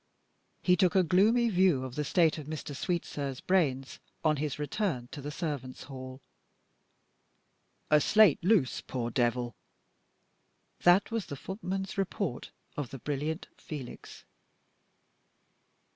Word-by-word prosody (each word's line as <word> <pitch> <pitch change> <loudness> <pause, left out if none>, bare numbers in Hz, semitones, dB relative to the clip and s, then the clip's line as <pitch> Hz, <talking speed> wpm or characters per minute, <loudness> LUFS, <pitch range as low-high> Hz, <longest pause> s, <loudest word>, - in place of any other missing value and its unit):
He 180 - +5
took 180 0 +2
a 190 - +6
gloomy 210 +8 +4
view 180 -8 +3
of 130 -2 -6
the 150 - -2
state 160 +1 +2
of 145 - -9
Mr. 155 -2 -5
Sweetsir's 145 -5 -3
brains 140 -8 0 0.3
on 155 -1 +3
his 145 -1 -2
return 150 - -2
to 145 - -7
the 145 - -5
servants' 145 -5 -4
hall. 130 -1 -9 1.7
"A 150 0 +6
slate 210 -6 +5
loose, 185 - +3
poor 120 -2 -4
devil!" 120 0 0 1.3
That 175 +5 +5
was 225 -3 -2
the 140 - -5
footman's 190 - -4
report 190 - -2 0.3
of 145 -5 -3
the 135 - -7
brilliant 150 +5 -3
Felix. 140 -6 -9
150 Hz, 125 wpm, -30 LUFS, 135-185 Hz, 1.7 s, a